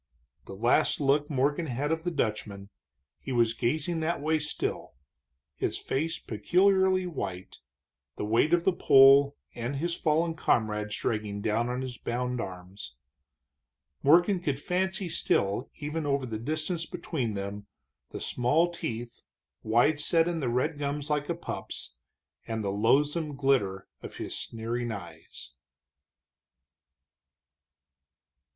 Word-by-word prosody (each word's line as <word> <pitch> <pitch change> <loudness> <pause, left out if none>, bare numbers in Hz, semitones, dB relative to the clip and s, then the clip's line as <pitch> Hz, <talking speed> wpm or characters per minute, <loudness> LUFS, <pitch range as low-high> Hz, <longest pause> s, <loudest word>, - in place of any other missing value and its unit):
The 95 - -8
last 120 +5 +2
look 145 +1 +2
Morgan 145 +3 0
had 140 +4 -2
of 160 0 0
the 175 - -1
Dutchman 105 - -3 0.5
he 135 - -7
was 115 -2 +3
gazing 155 +8 -1
that 160 +2 -1
way 155 +2 +1
still, 150 - -4 0.6
his - - -2
face 160 +5 -2
peculiarly 185 - +2
white, 95 - -5 0.6
the - - -3
weight 115 +8 +2
of 175 -1 +3
the 190 - +3
pole 140 -1 +6 0.2
and 120 +4 -4
his 170 +5 -1
fallen 165 +1 +1
comrades 105 -8 0
dragging 105 -2 -2
down 110 +3 0
on 125 +1 -2
his 125 -2 -6
bound 125 0 -2
arms. 90 -8 -8 1.1
Morgan 175 +6 +5
could 145 -6 -2
fancy 190 +3 -1
still, 100 -7 0
even 150 +1 -4
over 140 -2 0
the 110 -3 -4
distance 155 +6 -2
between 150 - -3
them, 100 +1 -5 0.4
the - - -7
small 150 +8 +1
teeth, 120 -6 -5 0.4
wide 120 +7 +3
set 165 +2 +3
in 170 -2 -1
the 130 -5 -1
red 145 +5 0
gums 145 +1 -3
like 150 +1 0
a 170 - 0
pup's, 165 - -6 0.5
and 110 -1 -3
the 100 - -1
loathsome 145 - +1
glitter 125 -9 +1
of - - -9
his - - -5
sneering 115 +1 -3
eyes. 85 -6 -9
135 Hz, 130 wpm, -28 LUFS, 110-160 Hz, 1.1 s, pole